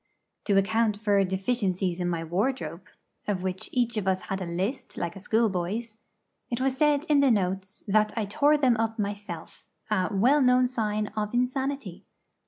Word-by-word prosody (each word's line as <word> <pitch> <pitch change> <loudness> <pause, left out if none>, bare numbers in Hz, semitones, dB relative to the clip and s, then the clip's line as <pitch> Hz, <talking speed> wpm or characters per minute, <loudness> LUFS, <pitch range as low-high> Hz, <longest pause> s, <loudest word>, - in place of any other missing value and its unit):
To 200 -2 +3
account 210 +2 +2
for 205 -2 +3
deficiences 190 -2 -1
in 175 0 0
my 165 -1 -2
wardrobe 180 - -2 0.4
(of 195 -3 -1
which 185 0 -4
each 240 -2 0
of 200 -2 -2
us 185 -1 +1
had 195 0 -4
a 180 - -3
list, 190 +10 -3
like 170 0 -3
a - - -8
schoolboy's) 215 +1 -1 0.5
it 235 - -2
was 265 0 +1
said 295 +1 +3
in 295 -2 +4
the 280 -1 +5
'notes' 190 -2 -1
that 215 +1 +3
I 220 - 0
tore 290 +9 +3
them 255 -5 +3
up 225 0 -1
myself 200 -5 -5 0.2
a 185 -3 +1
'well 250 +9 +4
known 250 0 +5
sign 215 -4 -1
of 210 +1 -2
insanity!' 255 -5 -2
210 Hz, 175 wpm, -27 LUFS, 190-245 Hz, 0.5 s, the